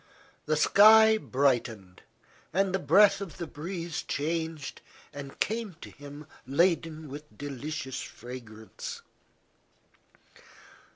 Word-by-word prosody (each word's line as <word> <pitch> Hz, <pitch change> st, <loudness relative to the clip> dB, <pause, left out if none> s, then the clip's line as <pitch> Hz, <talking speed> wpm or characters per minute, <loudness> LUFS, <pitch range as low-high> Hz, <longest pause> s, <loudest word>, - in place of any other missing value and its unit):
The 155 Hz, -, +2 dB
sky 220 Hz, +6 st, +7 dB
brightened, 120 Hz, -, -1 dB, 0.5 s
and 190 Hz, +2 st, +1 dB
the 190 Hz, -, +1 dB
breath 195 Hz, +7 st, +5 dB
of 195 Hz, -5 st, -7 dB
the 175 Hz, -, -4 dB
breeze 165 Hz, +2 st, -5 dB
changed 160 Hz, -1 st, -3 dB, 0.3 s
and 140 Hz, -1 st, -9 dB
came 220 Hz, -4 st, -2 dB
to -, -, -10 dB
him 145 Hz, 0 st, -11 dB, 0.2 s
laden 160 Hz, +1 st, +1 dB
with 150 Hz, +2 st, -11 dB
delicious 145 Hz, -1 st, -5 dB
fragrance. 115 Hz, -3 st, -9 dB
155 Hz, 100 wpm, -28 LUFS, 140-180 Hz, 0.5 s, sky